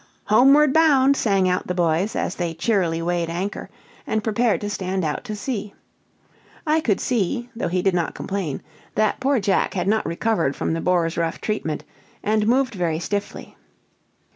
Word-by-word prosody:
"Homeward 270 +6 +5
bound," 280 -4 +5
sang 195 -7 +2
out 180 0 0
the 180 - -2
boys, 175 +3 +1
as - - -1
they 170 -2 -3
cheerily 170 -4 0
weighed 170 -1 -1
anchor, 180 +4 -4 0.4
and 215 -1 -1
prepared 225 +1 +1
to 205 - -3
stand 190 -2 -2
out 150 - -2
to 215 -3 -4
sea. 210 -2 -4 0.9
I 315 +1 +2
could 210 -10 +1
see, 240 +1 -1
though 230 - -2
he 180 +1 -1
did 195 - +2
not 175 -2 -1
complain, 190 -8 -4 0.3
that 215 -1 +1
poor 270 0 +2
Jack 200 0 +1
had 185 - -1
not 220 +2 +1
recovered 170 -5 0
from - - -2
the 165 - -2
boar's 175 -2 +1
rough 165 -1 -1
treatment, 185 -8 -3 0.4
and 215 0 +1
moved 255 0 +2
very 170 -5 -1
stiffly. 200 +4 -4
200 Hz, 170 wpm, -22 LUFS, 175-230 Hz, 0.9 s, Homeward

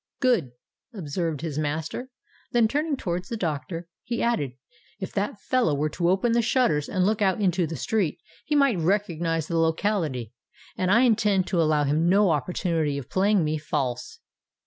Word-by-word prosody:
"Good!" 225 - +2 0.4
observed 165 -3 -3
his 155 -3 -3
master: 155 - -3 0.4
then, 235 -2 +4
turning 295 +4 -1
towards 180 -3 -3
the 230 - -3
doctor, 165 -1 -3 0.2
he 235 0 -3
added, 150 - 0 0.5
"If 190 - -6
that 205 +1 -2
fellow 245 - +1
were 150 +2 0
to 170 +2 0
open 195 +6 +2
the 235 +1 +3
shutters 220 - +1
and 185 -2 +1
look 215 +1 +1
out 190 -1 +2
into 180 -4 +1
the 160 - -5
street, 175 - -1 0.3
he 295 - -1
might 275 -9 +3
recognise 165 -3 0
the 165 -1 0
locality; 160 - 0 0.4
and 185 - -1
I 230 +5 +5
intend 210 -6 +3
to 175 - +2
allow 155 -2 +2
him 155 +4 +2
no 195 -1 +4
opportunity 160 -1 -1
of 135 -3 -8
playing 195 -1 +3
me 155 0 -1
false." 130 -5 -3
175 Hz, 170 wpm, -25 LUFS, 155-210 Hz, 0.5 s, I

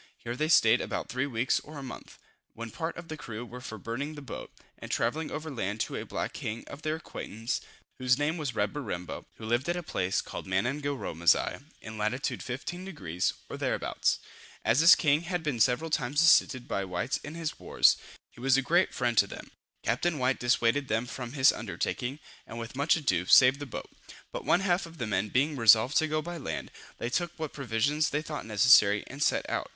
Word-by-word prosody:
Here 120 +1 -5
they 155 +4 0
stayed 115 -6 +5
about - - -4
three 130 +2 -1
weeks 125 -1 +1
or 150 0 -11
a 140 - -6
month, 130 - -9 0.4
when 115 0 -7
part 165 0 -4
of 175 -1 -8
the 155 - -5
crew 120 -5 -7
were 125 +1 -9
for 110 -3 -7
burning 130 +9 -4
the 145 - -8
boat, 130 - -8 0.3
and - - -8
travelling 160 0 -1
over 155 +1 -5
land 105 -4 -3
to - - -2
a - - -5
black - - -3
king 110 +2 -5
of 140 - -10
their 155 0 -1
acquaintance, 115 -8 -5 0.4
whose 130 0 +3
name 145 +3 0
was 145 -7 -3
Reberimbo, 105 -5 -3
who 110 - -9
lived 120 +7 0
at 175 - +1
a 175 - -4
place 95 - -1
called - - -6
Manangaromasigh, 120 - +1 0.2
in 110 0 -8
lat. 120 +7 -1
15 145 +8 -4
deg. 90 - -8 0.3
or - - -6
thereabouts. - - 0 0.5
As 115 +4 +4
this 165 +3 +9
king 150 -1 +2
had 175 0 -3
been 145 -6 -2
several 130 +8 +2
times 145 +3 +1
assisted 135 -6 +4
by 100 - -1
the 95 - -5
whites 90 +2 -1
in 145 +9 -9
his 165 -2 -4
wars, - - +4 0.4
he - - -18
was 135 +1 +4
a 135 - +1
great 175 +6 +2
friend 120 -2 0
to 100 - +4
them. - - -10 0.3
Captain 150 +9 0
White 130 0 +1
dissuaded 120 +2 +2
them 110 +1 0
from 125 -1 -6
this 130 0 +5
undertaking, 130 +3 -3 0.3
and 115 - -8
with 115 +1 -6
much 140 +4 +3
ado, 95 - 0
saved 130 +5 +7
the 145 - -6
boat; - - -7 0.4
but - - -6
one 180 - +3
half 180 -2 +1
of 165 0 -14
the 120 - -2
men 105 -1 -1
being 145 +6 +1
resolved 115 +2 +6
to 155 - +3
go 155 0 -1
by 175 +1 -5
land, 150 - -5 0.3
they 120 - -3
took 175 +3 -1
what 155 -2 -4
provisions 140 +4 0
they 150 +1 -1
thought 150 -7 -6
necessary, 105 -2 +6
and 135 +2 -9
set - - +2
out. - - -2
130 Hz, 210 wpm, -29 LUFS, 115-155 Hz, 0.5 s, this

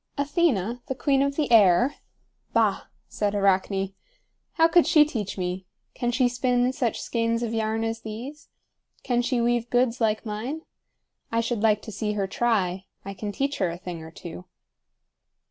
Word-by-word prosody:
"Athena, 275 - +1
the 265 - -2
queen 275 +1 +2
of 280 0 +1
the 295 -4 -1
air? 220 +4 +5 0.6
Bah!" - - +2 0.2
said 205 -1 -1
Arachne. 195 0 +1 0.6
"How 325 0 +5
could 335 +1 +4
she 305 -3 +6
teach 220 -11 -4
me? 180 0 -3 0.3
Can 240 - -2
she 245 +1 +3
spin 245 0 +1
such 245 -4 -1
skeins 230 0 -1
of 230 -1 -2
yarn 220 0 0
as 225 0 -3
these? 245 +8 -8 0.5
Can 245 -1 +1
she 245 0 0
weave 240 0 +1
goods 245 0 +1
like 220 +1 +1
mine? 230 +9 -4 0.7
I 230 - +1
should 230 -1 -1
like 210 -2 +3
to 220 - -7
see 210 0 -2
her 200 -2 -1
try. 190 -3 0 0.2
I 195 - -5
can 205 +2 -5
teach 275 +6 -2
her 185 -3 +2
a 170 - -5
thing 175 -2 -7
or 160 - -9
two." 170 +2 -9
230 Hz, 170 wpm, -25 LUFS, 200-250 Hz, 0.7 s, she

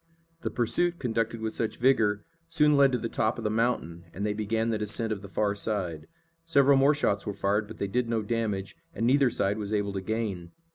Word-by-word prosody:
The - - -2
pursuit, 170 +9 0
conducted 115 -4 -2
with 110 0 -2
such 115 - -2
vigor, 110 -5 +2 0.2
soon 150 -3 +4
led 140 -1 +5
to - - +3
the 115 - -3
top 110 0 0
of 115 - -6
the 105 - 0
mountain, 110 -7 -1
and 100 +3 -3
they 105 - 0
began 110 +2 -1
the 110 - -1
descent 105 +2 -2
of 100 - -7
the 100 - -10
far 100 +1 0
side. 90 -7 -3 0.4
Several 140 -4 +4
more 140 +2 +4
shots 100 -8 0
were 100 - -3
fired, 105 +2 0
but 110 - -10
they - - -2
did 115 +4 -1
no 115 -2 0
damage, 105 -4 -2 0.2
and 115 - -1
neither 135 +1 +4
side 100 -2 -1
was 105 -1 -4
able 100 -2 0
to 95 - -3
gain. 95 -4 -3
110 Hz, 225 wpm, -28 LUFS, 100-120 Hz, 0.4 s, led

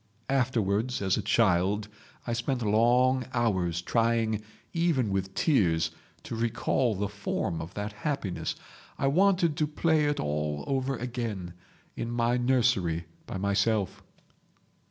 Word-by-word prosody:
Afterwards, 120 -3 +1
as 95 -2 +1
a - - -1
child, 100 0 +2 0.4
I 120 - -1
spent 120 +1 -1
long 120 +4 +3
hours 90 -7 +1
trying, 115 0 +1 0.3
even 160 - +1
with 95 0 -2
tears, 90 - +2 0.3
to - - -5
recall 115 0 0
the 100 +2 -1
form 100 -4 -3
of 85 +4 -8
that 105 +1 -4
happiness. 105 -5 -3 0.4
I - - -1
wanted 175 +2 +3
to 155 - +1
play 155 0 +2
it 145 0 0
all 75 0 -2
over 135 -1 -1
again—in 115 -4 -6
my 120 0 +1
nursery—by 95 -11 0
myself. 100 +1 0
115 Hz, 120 wpm, -28 LUFS, 95-130 Hz, 0.4 s, long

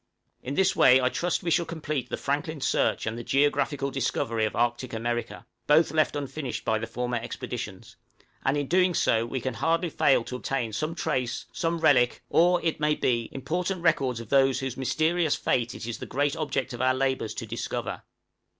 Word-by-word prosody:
In 135 +3 -4
this 190 +2 +3
way 130 0 +6
I 125 -1 +2
trust 175 +5 -1
we 170 - -1
shall 170 0 +2
complete 155 -6 -3
the - - -3
Franklin 145 +2 -2
search - - +1
and 110 +1 -3
the - - -6
geographical 140 0 +1
discovery 115 -4 -1
of 110 - -3
Arctic 120 +1 0
America, 120 +1 -3 0.2
both 150 +1 +5
left 155 -1 +2
unfinished 140 -2 -4
by 110 0 +1
the 115 - -4
former 125 0 -2
expeditions; 115 -3 -6 0.5
and 135 +2 +1
in 180 +5 +2
so 115 - +3
doing 115 +1 -3
we 130 - -2
can 130 +1 -3
hardly 165 +6 0
fail 135 - +3
to 125 - -5
obtain 125 -4 -2
some 155 +8 -2
trace, 125 -7 -2
some 170 -2 -1
relic, 130 -6 +3
or, 175 +1 +4
it 160 - 0
may 150 0 +2
be, 120 -5 0
important 175 +7 -3
records 130 -8 +2
of 115 -2 -9
those 135 -1 +4
whose 130 -2 -3
mysterious 155 +4 +1
fate 120 0 0
it - - -7
is 120 -1 -5
the - - -7
great 145 +1 0
object 145 -5 -2
of 120 - -5
our 130 0 +3
labors 130 -4 -1
to - - -5
discover. - - -4
135 Hz, 195 wpm, -27 LUFS, 120-155 Hz, 0.5 s, way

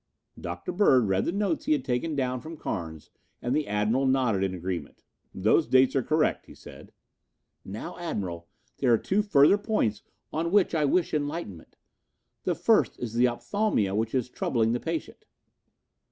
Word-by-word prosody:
Dr. - - -5
Bird 135 - +4
read 95 0 +1
the - - 0
notes 195 -3 -1
he - - +3
had 140 -3 -1
taken 135 +5 -1
down 130 -2 -1
from 160 +1 -9
Carnes 80 - -5 0.3
and 125 +3 -1
the 150 0 0
Admiral 105 +6 +1
nodded 115 -8 +1
agreement. 90 -1 -5 0.3
"Those 110 - +2
dates 130 +1 +4
are 135 - +3
correct," 155 +5 0
he - - -13
said. - - -13 0.7
"Now, 110 - -7
Admiral, 90 - -4 0.3
there 130 -3 +2
are 115 - +6
two 195 - 0
further 200 -1 +5
points 205 - 0 0.3
on 165 +2 -1
which 200 -2 +3
I 155 -3 +2
wish 170 +5 +1
enlightenment. 145 - -4 0.7
The - - +1
first - - +2
is 120 -3 -5
the 120 +2 +4
opthalmia 120 - 0
which 110 +4 -1
is 125 -2 0
troubling 115 -2 0
the 120 - 0
patient." 165 +1 -5
130 Hz, 165 wpm, -27 LUFS, 105-160 Hz, 0.7 s, are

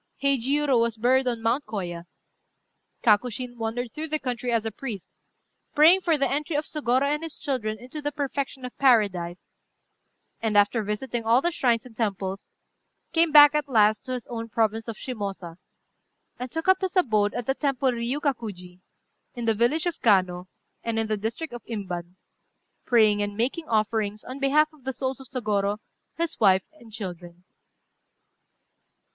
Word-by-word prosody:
Heijiurô 275 0 +2
was 230 -1 0
buried 255 +3 +3
on 235 -2 -2
Mount 235 +4 0
Kôya. 175 -5 -5 1.0
Kakushin 245 +3 +1
wandered 230 +1 -3
through 315 +1 -5
the 310 0 0
country 250 -3 -3
as 230 -2 +1
a 225 - -2
priest, 215 -4 -7 0.6
praying 330 +6 +7
for 330 -4 +2
the 275 -1 +2
entry 295 +3 -2
of 300 +1 0
Sôgorô 265 -4 +1
and 295 +2 0
his 325 -2 -6
children 250 -8 -2
into 255 +7 -8
the 290 0 -2
perfection 280 -2 -3
of 250 - -8
paradise; 200 -9 +2 0.9
and, 220 -2 +1
after 205 +3 +4
visiting 230 +3 -3
all 230 +2 +4
the 345 +5 0
shrines 240 -7 +1
and 240 -3 -14
temples, 195 -3 -3 0.6
came 330 -1 +3
back 295 -1 +9
at 300 -2 -1
last 215 -3 +3
to 255 - -4
his 250 -2 -4
own 230 -1 -6
province 225 0 0
of 230 - -4
Shimôsa, 195 -8 -6 0.8
and 250 +1 -4
took 325 +8 -4
up 375 0 +4
his 375 0 -2
abode 215 - +2
at 245 -1 -3
the 270 - +1
temple 275 -2 0
Riukakuji, 235 - -3 0.6
in 240 -1 -4
the 225 - +3
village 240 - +1
of 350 - -3
Kano, 185 -4 +2 0.4
and 230 -1 -2
in 225 - +1
the 215 0 -1
district 225 +9 -4
of 240 - -8
Imban, 180 -5 -5 0.7
praying 215 -4 +4
and 205 0 -3
making 275 +8 -1
offerings 215 -1 0
on 260 +2 -8
behalf 305 +3 +3
of 295 -4 -21
the 265 +1 -3
souls 260 0 -3
of 265 - -10
Sôgorô, 210 -5 -1 0.4
his 335 0 -2
wife 190 -3 +5
and 235 -8 -17
children. 180 -4 -8
235 Hz, 165 wpm, -25 LUFS, 210-275 Hz, 1.0 s, back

